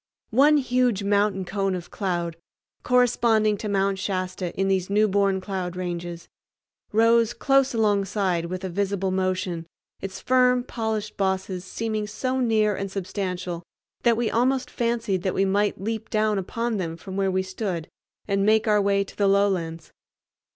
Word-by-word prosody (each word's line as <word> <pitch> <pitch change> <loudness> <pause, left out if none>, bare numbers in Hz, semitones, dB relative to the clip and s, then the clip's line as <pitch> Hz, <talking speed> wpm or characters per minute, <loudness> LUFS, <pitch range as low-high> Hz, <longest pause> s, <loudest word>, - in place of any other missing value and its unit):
One 285 +6 +5
huge 250 -6 +1
mountain 200 -1 +1
cone 195 0 -1
of 175 -2 -7
cloud, 175 -4 -2 0.5
corresponding 235 -4 +3
to 210 - -4
Mount 195 -1 +1
Shasta 185 -2 -2
in 195 - +2
these 190 -1 0
newborn 200 -2 +2
cloud 185 -2 -4
ranges, 175 -1 -5 0.6
rose 230 +2 +4
close 270 0 +2
alongside 200 -5 +1
with 185 +2 -5
a 190 - -3
visible 195 +1 -1
motion, 185 -3 -1 0.3
its 195 0 -6
firm, 250 -1 +3
polished 220 -3 -3
bosses 190 -1 -1
seeming 215 +1 -3
so 255 +5 -2
near 215 -4 +2
and 195 +1 -4
substantial 185 -2 -4 0.4
that 235 -2 +3
we 235 -1 0
almost 255 +3 +1
fancied 230 -5 -1
that 185 0 -1
we 195 - +2
might 205 +1 +1
leap 220 +2 -4
down 215 -1 +1
upon 230 +4 -2
them 165 -3 -3
from 190 +3 -8
where 195 -1 +1
we 190 0 0
stood 185 -3 -4 0.4
and 195 -1 +1
make 215 +2 +3
our 210 -1 +4
way 200 0 +2
to 195 - -14
the 200 - +2
lowlands. 185 -5 +1
200 Hz, 155 wpm, -25 LUFS, 185-220 Hz, 0.6 s, One